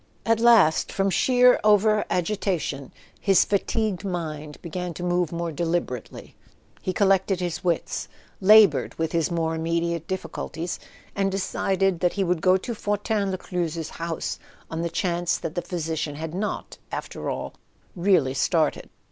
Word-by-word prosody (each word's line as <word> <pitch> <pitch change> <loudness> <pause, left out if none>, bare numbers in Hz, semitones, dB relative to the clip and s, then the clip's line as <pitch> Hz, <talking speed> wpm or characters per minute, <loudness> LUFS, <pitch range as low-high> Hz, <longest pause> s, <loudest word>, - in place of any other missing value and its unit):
At 225 -1 +3
last, 225 -9 +5
from 195 0 0
sheer 250 +5 +5
over 210 0 +4
agitation, 175 -7 -1 0.3
his 195 -2 +4
fatigued 205 -1 -1
mind 155 -5 -5
began 175 0 -4
to 175 - -6
move 175 -2 0
more 170 0 -3
deliberately: 165 -6 -3 0.5
he 185 - -1
collected 195 -1 +2
his 175 -2 -3
wits, 175 -2 -1 0.3
laboured 210 +1 +6
with 160 -1 -2
his 165 -2 +1
more 165 -2 -1
immediate 165 0 -1
difficulties, 170 -1 -4 0.4
and 195 -1 +1
de¬ 195 - -1
cided 195 -1 0
that 180 0 +1
he 200 - 0
would 180 -3 0
go 185 +1 +5
to 235 +5 -5
Fortin 205 -1 -1
Lescluze's 170 -4 -3
house, 165 -1 -4 0.3
on 165 0 -2
the 170 - -1
chance 175 0 0
that 160 - -5
the 175 - -2
physician 160 -4 -3
had 160 +1 -5
not, 205 +3 -4
after - - -5
all, - - -4 0.4
really 175 -8 +3
started. 150 +3 +1
175 Hz, 145 wpm, -25 LUFS, 165-195 Hz, 0.5 s, laboured